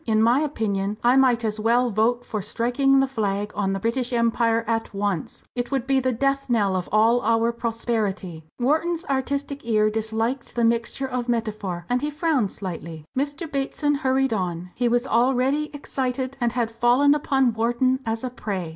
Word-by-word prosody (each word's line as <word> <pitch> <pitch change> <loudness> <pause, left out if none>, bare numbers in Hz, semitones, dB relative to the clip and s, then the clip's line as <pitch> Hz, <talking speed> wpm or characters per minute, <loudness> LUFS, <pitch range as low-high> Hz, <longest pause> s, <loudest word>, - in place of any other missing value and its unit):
In 220 -1 +3
my 240 +4 +4
opinion 210 -9 -1
I 245 +2 +5
might 250 -3 +3
as 215 0 -2
well 235 +3 +2
vote 235 +4 +1
for 215 -3 -3
striking 245 +6 +2
the 270 - +1
flag 210 -4 -2
on 195 -2 -1
the 195 - -2
British 235 +4 -1
Empire 230 -1 +2
at 225 -2 -2
once! 200 -5 -3
It 245 -1 -3
would 270 -3 -1
be 270 0 +2
the 260 0 0
death 275 +3 0
knell 205 -5 +2
of 180 -1 -3
all 225 +3 +4
our 230 +1 +2
prosperity." 220 -7 -3 0.2
Wharton's 320 +7 0
artistic 280 +1 -2
ear 215 -2 +2
disliked 225 +4 -2
the 240 - +1
mixture 235 +3 +1
of 250 -1 -3
metaphor, 210 -7 -2
and 250 0 0
he 295 - -1
frowned 295 - 0
slightly. 165 -4 -6
Mr. 285 +5 -2
Bateson 285 +1 0
hurried 270 -3 +1
on. 180 -3 -3
He 245 - 0
was 245 +1 +1
already 265 +5 +2
excited, 265 -2 -3
and 240 -1 +1
had 235 -2 -1
fallen 245 +5 +4
upon 270 -4 +1
Wharton 240 +3 +1
as 225 0 -3
a 255 - -3
prey. 195 -8 -4
235 Hz, 180 wpm, -24 LUFS, 215-265 Hz, 0.2 s, I